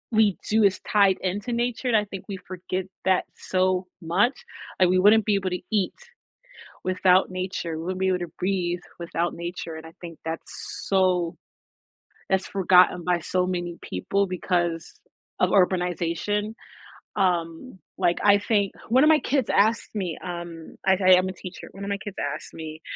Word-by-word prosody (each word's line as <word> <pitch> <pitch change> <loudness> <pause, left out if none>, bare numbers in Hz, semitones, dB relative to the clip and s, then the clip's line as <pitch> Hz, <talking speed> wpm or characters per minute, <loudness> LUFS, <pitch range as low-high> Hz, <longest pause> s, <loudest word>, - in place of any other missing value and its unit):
We 215 -4 +3
do, 220 +1 +4
it's 195 -2 +3
tied 200 -3 +3
into 200 +6 -2
nature 240 +2 -1
and 240 - +3
I 210 - +4
think 195 -2 -8
we 200 -2 -5
forget 185 0 -4 0.2
that 190 -1 +3
so 185 0 0
much 185 +10 +2 0.5
and 185 -1 +5
we 185 0 +3
wouldn't 210 +3 +6
be 210 - +2
able 190 -2 -1
to 180 - -3
eat 205 -4 +1 0.9
without 185 0 +3
nature, 185 -3 -3
we 160 - -5
wouldn't 185 +2 -3
be 190 - +2
able 185 -1 +1
to 175 -3 -5
breathe 180 -2 0 0.2
without 170 0 -2
nature 170 -1 -6
and 160 0 -9
I 160 - -11
think 170 -2 -9
that's 165 0 -6
so 185 -3 +2 0.9
that's 190 0 +1
forgotten 180 -2 +4
by 180 0 +1
so 180 +2 0
many 175 -2 -3
people 195 - -1
because 175 -2 -1 0.5
of - - +3
urbanization, 185 +3 +1 0.6
um, 175 +2 -1 0.2
like, 175 -2 +1
I 205 0 +6
think 205 -1 +1 0.2
1 255 +4 +5
of - - +6
my 315 - +7
kids 270 -5 0
asked 220 +3 +2
me, 180 -6 -2
um 170 -2 -7
I 190 - +5
I 185 0 +8
am 185 +1 +1
a 185 - -4
teacher, 185 0 -9
1 195 - -9
of 200 - -4
my 200 - -1
kids 200 0 -8 0.2
asked - - -10
me, 160 -1 -8
185 Hz, 175 wpm, -25 LUFS, 175-200 Hz, 0.9 s, I